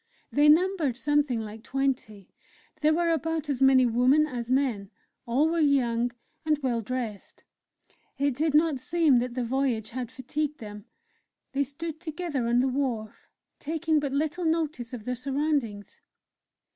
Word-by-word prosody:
They 295 +1 +5
numbered 325 -5 +3
something 290 -4 +1
like 215 0 -8
twenty; 255 -7 -3 0.5
there 305 0 +3
were 335 +1 +2
about 325 -1 -1
as 270 -2 -3
many 265 -1 +6
women 250 +6 +4
as 245 -5 -5
men; 255 -7 0 0.4
all 265 +7 +3
were 335 +1 0
young, 245 -5 +2 0.3
and 310 -1 +2
well 240 -3 0
dressed. 225 -3 -5 0.7
It 280 0 +1
did 300 +3 0
not 305 -3 +3
seem 310 -2 +3
that 245 0 -3
the 250 - -1
voyage 240 -3 -1
had 245 -1 -5
fatigued 290 +3 -3
them; 210 -2 -9 0.7
they 280 +1 +1
stood 315 +3 -6
together 320 -6 -3
on 240 +1 +3
the 265 - +1
wharf, 250 -5 -3 0.3
taking 320 +1 0
but 285 -2 -2
little 310 +5 -1
notice 310 -7 -1
of 235 -4 -7
their 250 - -1
surroundings. 265 -5 -2
270 Hz, 150 wpm, -27 LUFS, 240-305 Hz, 0.7 s, many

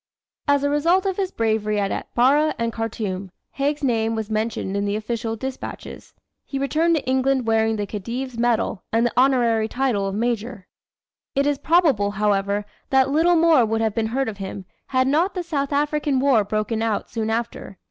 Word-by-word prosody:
As 285 -1 +3
a 285 - +2
result 335 +6 +2
of 385 -2 -1
his 385 -2 0
bravery 220 - 0
at 200 -1 -1
Atbara 285 +6 +2
and 230 0 -2
Khartoum, 205 -4 -4 0.2
Haig's 285 +2 -1
name 225 -3 +1
was 220 -1 -4
mentioned 215 -3 -2
in 200 0 0
the 200 0 -1
official 225 +1 -3
despatches. 260 +4 -7 0.3
He 275 - -5
returned 315 +5 +2
to 300 - -2
England 260 -1 +1
wearing 225 0 +2
the 205 -1 -2
Khedive's 235 +6 -5
medal 230 -4 0
and 230 +1 +2
the 240 - 0
honorary 240 -4 +3
title 235 -5 0
of 195 - -3
Major. 230 -3 -2 0.7
It 275 +1 +2
is 290 -1 +1
probable, 310 - +3
however, 205 0 0 0.2
that 265 0 +3
little 335 +4 +4
more 325 -5 +5
would 225 0 0
have 220 -2 0
been 220 0 0
heard 260 +4 -1
of 215 -3 -5
him, 190 0 -6 0.2
had 260 0 +1
not 330 +9 +1
the 360 - -2
South 285 -4 -2
African 290 -1 +1
War 260 -5 +4
broken 215 +2 -2
out, 225 -2 -1
soon 220 -1 -2
after. 225 -4 -4
235 Hz, 185 wpm, -22 LUFS, 215-275 Hz, 0.7 s, more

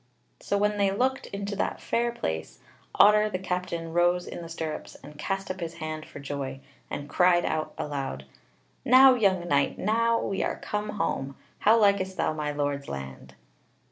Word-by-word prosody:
So 200 - -1
when 210 +1 +1
they 200 -1 +4
looked 255 +7 0
into 200 0 -4
that - - -1
fair 235 0 0
place, 80 - -4 0.4
Otter 210 +1 +6
the 185 - -2
Captain 180 -3 -3
rose 175 +1 +2
in - - -7
the 165 - -8
stirrups 160 -2 -5
and 150 - -11
cast 195 +5 -3
up 185 - -7
his 165 -1 -5
hand 155 -1 -5
for - - -11
joy, 140 -1 -5 0.3
and 145 - -5
cried 175 +3 +3
out 155 0 -2
aloud: 135 - -4 0.6
"Now, 260 +1 +8
young 190 -7 +2
knight, 140 -3 +2
now 230 +3 +2
we 195 - -2
are - - -1
come 210 0 -3
home: 135 -8 -2 0.2
how 220 +2 +5
likest 200 -3 +2
thou - - +1
my 150 -1 -2
Lord's 145 -1 -2
land?" 65 -1 -8
175 Hz, 175 wpm, -27 LUFS, 145-205 Hz, 0.6 s, Now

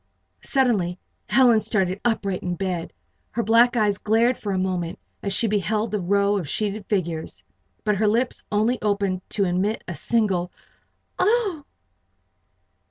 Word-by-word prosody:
Suddenly 210 -10 +1 0.3
Helen 245 -4 +5
started 190 -3 0
upright 200 -5 0
in 180 -1 -2
bed. 180 -2 -3 0.4
Her 235 - -2
black 235 +3 +4
eyes 210 -2 +2
glared 230 +4 +2
for 205 - -5
a 190 - 0
moment 180 -2 -2 0.2
as 200 - -2
she 230 - +1
beheld 210 +1 0
the 210 - 0
row 200 +2 +2
of 170 -8 -4
sheeted 210 +1 -2
figures. 170 -6 -2 0.4
But 210 -2 +1
her 215 +2 +2
lips 235 +4 +1
only 220 +4 +1
opened 200 -3 0
to 205 - 0
emit 190 +4 0
a 175 - -4
single 190 -3 0 0.7
"Oh!" 390 -6 +1
205 Hz, 145 wpm, -23 LUFS, 185-230 Hz, 0.7 s, Helen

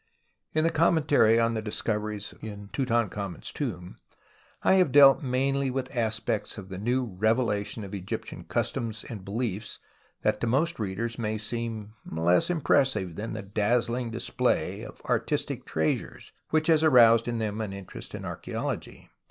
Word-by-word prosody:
In 155 - +3
the 165 - +3
commentary 145 -8 +4
on 115 0 +2
the 110 - -2
discoveries 105 -1 -3
in 100 -2 -8
Tutankhamen's 115 -7 -1
tomb 90 - -5 0.7
I - - +5
have 175 - +2
dealt 140 -1 +8
mainly 135 +1 0
with 130 +1 -4
aspects 110 -2 -1
of 95 -2 -8
the 95 -1 -6
new 125 +4 +1
revelation 110 +1 0
of 100 0 -8
Egyptian 95 -2 -5
customs 110 -2 -2
and 105 -5 -8
beliefs 105 0 -3 0.5
that - - +1
to 120 - 0
most 155 +7 +1
readers 110 +4 -3
may 110 -1 -1
seem 110 -1 -5
less 85 - +2
impressive 135 - +2
than 110 +4 -4
the 110 -2 -5
dazzling 115 +4 0
display 115 +1 0
of - - -11
artistic - - -1
treasures 80 0 -2 0.2
which 155 0 +2
has 160 -2 +4
aroused 115 -6 +6
in 120 -1 -1
them 110 -1 -2
an 105 -3 -3
interest 100 -1 -7
in - - -7
archa?ology. - - -5
115 Hz, 150 wpm, -27 LUFS, 105-130 Hz, 0.7 s, dealt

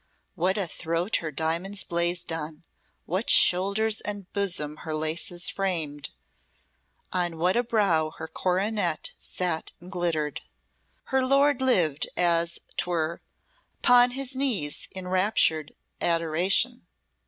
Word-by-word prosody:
What 185 +3 0
a 200 - +1
throat 170 +4 -1
her 160 - -4
diamonds 170 +7 0
blazed 170 0 0
on, 155 0 -6 0.4
what 185 +7 -2
shoulders 200 +4 +5
and 205 -2 -4
bosom 175 -7 -1
her 155 0 -5
laces 165 +3 -1
framed, 160 -7 -1 1.0
on 175 -2 -1
what 180 +3 +2
a 240 - +3
brow 195 -9 +1
her 160 +1 -9
coronet 185 -1 -1
sat 175 -3 -3
and 180 +2 -13
glittered. 165 -5 -2 0.7
Her 265 0 +3
lord 275 +1 +3
lived 175 - +2
as 170 -1 +1 0.2
'twere 170 -2 -1 0.6
upon 245 0 +6
his 270 -1 -4
knees 225 - 0
in 185 -1 -6
enraptured 185 -5 +1 0.3
adoration. 175 +9 +1
175 Hz, 120 wpm, -26 LUFS, 160-205 Hz, 1.0 s, upon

